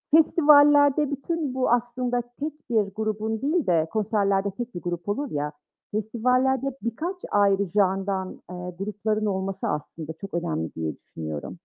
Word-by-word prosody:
festivallerde 290 -2 +6
bütün 285 0 -2
bu 260 - +1
aslında 245 0 +1 0.2
tek 300 -2 -6
bir 225 -2 +4
grubun 220 0 -2
değil 305 - +1
de 165 -2 +3
konserlerde 200 -2 +1
tek 240 +1 -6
bir 175 - -4
grup 175 +2 -4
olur 275 +6 -2
ya, 150 0 -2 0.4
festivallerde 250 +5 +1 0.2
birkaç 320 - -2 0.2
ayrı 200 -1 +4
genre'dan, 195 0 0 0.2
eee, 180 0 -6
grupların 215 +1 -1
olması 195 -1 -2
aslında 155 +1 -4
çok 195 +4 -10
önemli 165 - -2
diye 80 -1 -3
düşünüyorum. 75 -2 -6
215 Hz, 140 wpm, -25 LUFS, 190-260 Hz, 0.4 s, festivallerde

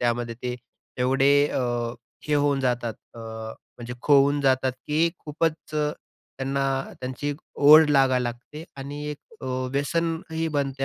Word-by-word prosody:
त्यामध्ये 120 -1 -1
ते 125 0 -2 0.4
एवढे 135 +2 +4 0.2
अ, - - -1 0.7
हे 150 - +1
होऊन 145 -1 +2
जातात, 120 -3 -1 0.2
अ, - - -11 0.6
म्हणजे 120 0 -6
खोवून 145 0 +4
जातात 130 -1 +2
की 155 +3 +2
खूपच 160 +2 -1 0.2
त्यांना 140 -2 -3 0.4
त्यांची 130 +3 -4
एक 145 - -2 0.3
ओढ 155 +1 +9
लागायला 135 -3 +4
लागते 125 +6 -6
आणि 140 +2 -6
एक 150 - -6 0.2
अ, - - -8 0.3
व्यसनही 160 +2 -1
बनते 135 -1 -2
140 Hz, 135 wpm, -25 LUFS, 130-150 Hz, 0.7 s, ओढ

